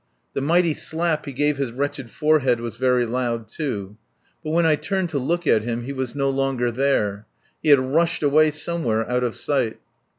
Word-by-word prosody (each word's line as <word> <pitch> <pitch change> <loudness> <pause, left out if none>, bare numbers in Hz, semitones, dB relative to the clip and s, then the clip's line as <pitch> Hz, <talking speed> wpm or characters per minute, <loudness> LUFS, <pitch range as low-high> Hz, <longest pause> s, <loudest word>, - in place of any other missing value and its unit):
The - - -2
mighty 170 +3 +3
slap 160 0 -2
he - - -3
gave 145 +2 +1
his 135 -4 -2
wretched 140 0 -3
forehead 135 -1 +2
was 115 -1 -5
very 125 -1 +2
loud, 120 -1 -2
too. 105 -9 -5 0.5
But 155 - -4
when 165 +2 +2
I 160 -1 +4
turned 190 +2 -2
to 145 - 0
look 170 +6 -1
at 110 -7 +4
him 120 +1 -3
he 140 +3 -5
was 130 -1 -4
no 135 -1 +1
longer 135 -3 0
there. 110 -5 0 0.3
He - - 0
had 145 -2 +8
rushed 155 +6 0
away 155 +2 +5
somewhere 150 -8 -1
out 125 0 0
of 120 -2 -1
sight. 130 -6 -1
135 Hz, 195 wpm, -23 LUFS, 120-155 Hz, 0.5 s, had